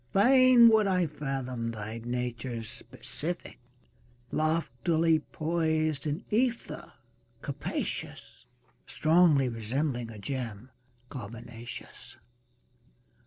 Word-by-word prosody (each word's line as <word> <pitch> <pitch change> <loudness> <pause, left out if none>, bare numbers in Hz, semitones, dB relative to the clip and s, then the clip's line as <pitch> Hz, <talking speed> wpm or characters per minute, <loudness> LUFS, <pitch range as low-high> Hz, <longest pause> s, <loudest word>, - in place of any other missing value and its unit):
Fain 250 +3 +7
would 220 -2 +4
I 180 -2 +2
fathom 135 -5 -3
thy 110 0 -6
nature's 120 -1 -3
specific 140 +9 -4 0.7
Loftily 160 +1 +2
poised 155 -2 -1
in 150 +5 -3
ether 235 +2 -1 0.5
capacious. - - -5 0.4
Strongly 155 -4 +4
resembling 120 +2 -2
a 110 - -9
gem 120 +1 -5 0.4
carbonaceous. 120 -1 -8
140 Hz, 75 wpm, -29 LUFS, 120-165 Hz, 0.7 s, Fain